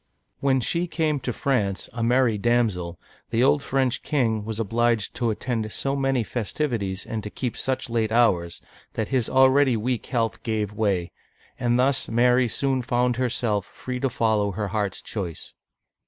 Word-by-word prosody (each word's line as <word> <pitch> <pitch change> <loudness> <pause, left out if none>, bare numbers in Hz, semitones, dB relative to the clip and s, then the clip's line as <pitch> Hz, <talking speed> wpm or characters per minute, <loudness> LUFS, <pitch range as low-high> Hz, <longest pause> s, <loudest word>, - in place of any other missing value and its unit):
When 135 -2 +2
she 170 +8 0
came 155 -4 0
to 125 -1 -3
France, 105 -8 -1
ac 120 - -4
merry 120 0 +3
damsel, 100 -7 0 0.3
the 115 +1 +2
old 140 +2 +4
French, 130 -2 0
king 115 -8 0
was 110 0 -4
obliged 115 0 +1
to 120 -2 +1
attend 110 0 -2
so 135 +4 -1
many 135 -3 +1
festivities 110 -4 -2
and 110 -1 -4
to 105 - -6
keep 125 +2 -4
such 130 -1 -2
late 115 -2 0
hours, 90 -8 +2 0.3
that 110 - -2
his 130 -4 0
already 130 -1 +5
weak 120 +2 -2
health 115 -3 -1
gave 105 -2 -2
way, 100 -5 0 0.5
and 120 -1 +2
thus 130 0 +2
Mary 125 +2 +4
soon 135 +2 0
found 125 0 +1
herself 115 -5 0
free 125 -1 -6
to 135 - 0
follow 110 -4 +1
her 105 +1 -3
heart's 105 -2 -2
choice. 90 -7 -5
120 Hz, 165 wpm, -24 LUFS, 110-130 Hz, 0.5 s, already